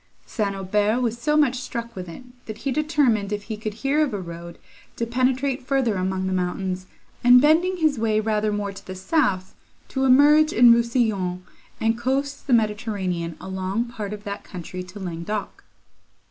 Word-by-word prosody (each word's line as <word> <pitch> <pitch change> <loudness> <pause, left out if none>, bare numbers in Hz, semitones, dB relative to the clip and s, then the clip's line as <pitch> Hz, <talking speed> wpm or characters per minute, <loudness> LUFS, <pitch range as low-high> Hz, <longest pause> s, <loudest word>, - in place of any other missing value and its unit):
St. 205 -4 -2
Aubert 205 +4 +1
was 235 -2 -1
so 300 +4 +1
much 260 -4 +3
struck 235 -2 -6
with 180 -2 -6
it, 165 - -10 0.2
that 215 -1 -6
he 275 - -3
determined, 265 -8 +1
if 205 -1 -3
he 220 - -5
could 215 -1 -5
hear 280 +6 +1
of 270 -8 -2
a - - -3
road, 170 -1 -8 0.4
to 230 - -2
penetrate 255 +3 0
further 260 -3 +1
among 190 0 -1
the 190 - -1
mountains, 185 0 -2 0.4
and, 245 +1 +8
bending 330 +6 +3
his 310 -7 +1
way 220 -1 +2
rather 215 -1 0
more 205 -1 -2
to 195 - -11
the 185 - -8
south, 190 - 0 0.4
to 265 - -1
emerge 295 +4 +6
into 235 0 +7
Rousillon, 220 -7 0 0.4
and 225 +1 +1
coast 275 +4 -2
the - - -2
Mediterranean 205 -6 -1
along 190 +5 -3
part 210 -4 -6
of 210 -1 -7
that 200 -1 -6
country 180 0 -7
to 185 +3 -10
Languedoc. 185 +3 -5
220 Hz, 175 wpm, -23 LUFS, 190-255 Hz, 0.4 s, and